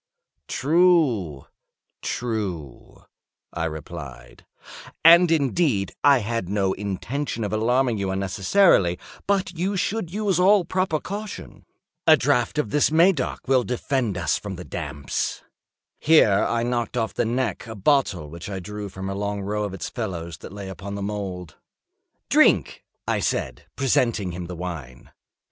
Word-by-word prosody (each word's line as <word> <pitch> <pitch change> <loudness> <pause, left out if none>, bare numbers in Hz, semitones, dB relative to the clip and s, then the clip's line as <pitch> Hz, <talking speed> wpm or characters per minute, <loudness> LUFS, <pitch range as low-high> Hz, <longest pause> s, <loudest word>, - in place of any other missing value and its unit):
"True—true," 115 - -1 0.5
I 85 -1 -2
replied; 75 -3 -8 0.6
"and, 170 +1 +8
indeed, 140 - +1
I 140 -1 +7
had 115 -5 -2
no 100 -2 +1
intention 115 +6 -3
of 105 - -3
alarming 120 +1 +1
you 100 -1 -1
unnecessarily—but 100 - +1
you 190 +4 -1
should 185 -1 -2
use 200 -3 0
all 190 0 +5
proper 185 -4 0
caution. 205 +4 -7 0.4
A 155 -1 +8
draught 135 -2 +1
of 125 -9 -1
this 150 - +3
Medoc 165 -2 +2
will 130 -1 +3
defend 120 -2 -1
us - - 0
from 100 -2 -6
the 90 0 -9
damps." 70 -4 -4 0.6
Here 110 -11 +4
I 115 0 0
knocked 120 0 -2
off 110 -2 -1
the - - 0
neck 120 -2 -2
of - - -7
a - - -11
bottle 100 - +1
which 85 +5 -8
I 95 -2 -4
drew 105 +2 -6
from 95 +1 -7
a 95 - -3
long 100 0 -3
row 105 +1 -2
of 100 - -5
its 95 - -5
fellows 85 -8 -5
that - - -10
lay 100 -1 -7
upon 100 +1 -7
the 100 - -4
mould. 95 -5 -5 0.7
"Drink," - - +3 0.2
I - - +1
said, 75 - -2
presenting 115 -7 +1
him 85 0 -6
the 90 - -6
wine. 80 -8 -7
105 Hz, 145 wpm, -24 LUFS, 95-145 Hz, 0.7 s, and